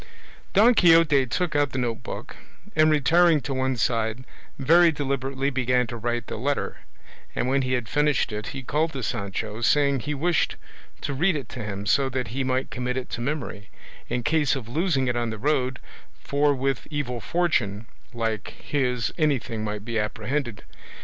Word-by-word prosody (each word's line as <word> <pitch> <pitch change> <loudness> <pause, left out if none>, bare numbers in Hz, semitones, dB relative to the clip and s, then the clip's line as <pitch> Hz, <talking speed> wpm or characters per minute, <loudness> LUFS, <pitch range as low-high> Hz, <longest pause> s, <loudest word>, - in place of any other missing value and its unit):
Don 220 +5 +6
Quixote 165 - +5
took 175 +4 -1
out 145 -1 +2
the - - -2
note 120 -3 -1
book, - - -7 0.4
and, 155 0 +5
retiring 155 +2 +4
to 135 +2 -3
one 130 -1 0
side, 115 +1 0 0.3
very 165 +5 +5
deliberately 135 -1 -2
began 125 -1 +2
to 120 - -7
write 120 0 -2
the - - -5
letter, 140 +5 -2 0.6
and - - 0
when 135 +1 +2
he 130 0 -1
had 120 -3 -1
finished 150 -3 +1
it 105 0 -4
he 135 -1 -6
called 155 +5 0
to 135 -2 -4
Sancho, 105 +2 -3
saying 140 +2 +3
he 150 +5 -3
wished 165 +3 +1 0.5
to 140 - -2
read 170 +6 +2
it 135 -6 -5
to 125 - -6
him, 100 -1 -5
so 135 +6 +3
that 130 -4 -3
he 135 +5 -2
might 130 0 -1
commit 125 0 -2
it 130 - -5
to 120 - -4
memory, 125 -7 -4 0.4
in 125 - -1
case 150 -2 +2
of 125 -5 -6
losing 140 0 0
it 125 - 0
on 120 -1 -1
the 110 - -5
road; 130 0 0 0.4
for 145 0 +1
with 135 -1 -1
evil 130 -6 -3
fortune 115 - 0 0.3
like 115 -3 -3
his 125 -5 -1
anything 130 -7 0
might 105 -1 -4
be 115 -1 -1
apprehended. 110 +3 -3
130 Hz, 180 wpm, -25 LUFS, 120-145 Hz, 0.6 s, Don